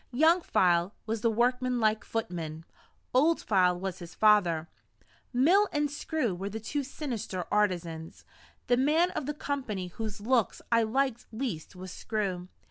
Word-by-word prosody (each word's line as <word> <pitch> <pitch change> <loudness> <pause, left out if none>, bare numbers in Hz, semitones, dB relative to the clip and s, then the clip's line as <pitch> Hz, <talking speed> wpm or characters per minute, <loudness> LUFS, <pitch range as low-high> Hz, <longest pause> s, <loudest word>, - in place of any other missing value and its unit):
Young 320 +8 +4
File 175 - +2
was 220 0 -2
the 230 - +3
workman 250 +2 +1
like 215 -1 +2
footman; 165 -7 -4 0.5
Old 310 +6 +4
File 180 -3 +2
was 190 -1 -4
his 170 -2 -10
father; 180 -7 +4 0.6
Mill 340 +12 +4
and 295 -1 0
Screw 290 - -1
were 190 +3 -4
the 220 +2 -5
two 285 +7 -2
sinister 240 - -4
artisans. 170 -6 -1 0.4
The 245 - +3
man 315 +7 +3
of 285 - -4
the 295 - -2
company 240 -12 -3
whose 215 +3 -5
looks 230 -1 +1
I 230 0 +5
liked 250 +2 0
least 220 - -4
was 185 0 -8
Screw. 190 -5 -3
220 Hz, 150 wpm, -29 LUFS, 185-260 Hz, 0.6 s, I